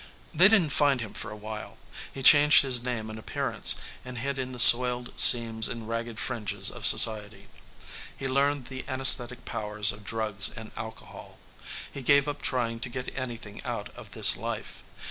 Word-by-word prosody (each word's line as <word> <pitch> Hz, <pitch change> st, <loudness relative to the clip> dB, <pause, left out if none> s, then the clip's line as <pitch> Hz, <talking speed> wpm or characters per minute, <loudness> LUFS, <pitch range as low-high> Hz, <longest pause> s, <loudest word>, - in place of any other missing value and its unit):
They 175 Hz, +4 st, +4 dB
didn't 195 Hz, -8 st, 0 dB
find 140 Hz, -2 st, 0 dB
him 110 Hz, -3 st, -9 dB
for -, -, -7 dB
awhile. 105 Hz, +1 st, -11 dB, 0.3 s
He 135 Hz, -, -11 dB
changed 150 Hz, +1 st, +5 dB
his 130 Hz, -3 st, -1 dB
name 120 Hz, -3 st, -6 dB
and 110 Hz, -, -11 dB
appearance -, -, +1 dB, 0.3 s
and 125 Hz, 0 st, -11 dB
hid 135 Hz, +3 st, -6 dB
in 130 Hz, 0 st, -7 dB
the 125 Hz, -, -11 dB
soiled 125 Hz, 0 st, +5 dB
seams 115 Hz, -2 st, +5 dB
and 115 Hz, -2 st, -10 dB
ragged 115 Hz, 0 st, -7 dB
fringes 110 Hz, -4 st, -2 dB
of -, -, 0 dB
society. 105 Hz, -2 st, +1 dB, 0.7 s
He 135 Hz, -, -7 dB
learned 140 Hz, 0 st, -3 dB
the 130 Hz, 0 st, -10 dB
anaesthetic 125 Hz, -2 st, +3 dB
powers 105 Hz, -1 st, 0 dB
of 105 Hz, +1 st, -14 dB
drugs 105 Hz, -2 st, -1 dB
and 110 Hz, -1 st, -13 dB
alcohol. 110 Hz, 0 st, -13 dB, 0.6 s
He 140 Hz, -, -9 dB
gave 140 Hz, +2 st, +1 dB
up 145 Hz, 0 st, -8 dB
trying 115 Hz, -3 st, -4 dB
to 125 Hz, -, -8 dB
get 125 Hz, +1 st, -9 dB
anything 120 Hz, -5 st, -9 dB
out -, -, -8 dB
of -, -, -15 dB
this -, -, +5 dB
life. -, -, -9 dB
120 Hz, 170 wpm, -24 LUFS, 110-135 Hz, 0.7 s, changed